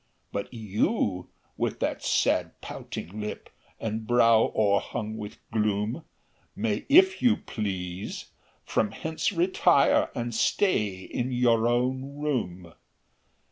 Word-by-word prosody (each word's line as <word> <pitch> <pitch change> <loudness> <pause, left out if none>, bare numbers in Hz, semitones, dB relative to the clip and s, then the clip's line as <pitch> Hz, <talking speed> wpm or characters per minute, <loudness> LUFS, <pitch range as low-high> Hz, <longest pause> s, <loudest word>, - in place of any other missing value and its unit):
"But 100 - -4
you, 105 - -1 0.3
with - - -1
that - - -1
sad - - +1
pouting 100 +6 -7
lip, 105 - -6 0.3
And 110 0 -3
brow 115 -2 +5
o'erhung 105 +1 0
with 105 -1 -7
gloom, 105 +6 -1 0.5
May, 105 -1 -2
if 375 +6 +6
you 245 -3 +4
please, 95 -3 -5 0.3
from 105 - 0
hence 160 +2 -2
retire, 175 -4 +3
And 120 0 -3
stay 105 - +1
in 125 +6 -3
your 120 -2 +3
own 130 +3 0
room. 95 - -3
115 Hz, 110 wpm, -27 LUFS, 105-130 Hz, 0.5 s, if